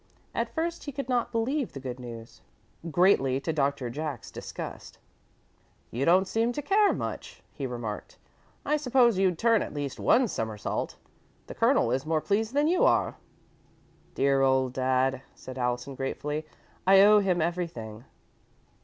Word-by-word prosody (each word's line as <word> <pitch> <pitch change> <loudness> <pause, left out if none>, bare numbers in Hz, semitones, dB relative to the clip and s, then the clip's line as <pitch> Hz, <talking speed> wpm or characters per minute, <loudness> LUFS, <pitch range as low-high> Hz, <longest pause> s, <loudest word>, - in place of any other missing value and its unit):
At - - -1
first 335 +1 -2
he 285 - -4
could 275 -1 -5
not 245 -2 0
believe 245 +4 -1
the 135 - -6
good 130 -1 -6
news, 115 -2 -10 0.5
greatly 145 -6 +3
to 160 - -2
Doctor 140 -3 0
Jack's 145 -3 -5
disgust. - - -8 0.9
"You 130 +4 -1
don't 185 +3 +4
seem 230 +3 0
to 295 - -3
care 405 +5 +4
much," - - -5
he 135 - -4
remarked. 120 -4 -6 0.5
"I 300 +1 +2
supposed 250 -7 +3
you'd 185 -3 +2
turn 230 +1 +3
at - - -5
least 145 -2 -4
one 250 0 +4
somersault. 110 - -3 0.5
The - - -8
Colonel 115 - +2
is 130 +1 0
more 160 -1 +2
pleased 215 - -1
than 295 +1 +3
you 355 +2 +2
are." - - +2 1.0
"Dear 135 0 +2
old 130 -1 +2
dad," 130 0 +1
said 130 0 -9
Allison, 125 +2 -2
gratefully. 150 +3 -4 0.4
"I 195 0 +8
owe 210 +1 +7
him 185 -3 +1
everything." 155 -10 -3
155 Hz, 155 wpm, -28 LUFS, -, 1.0 s, I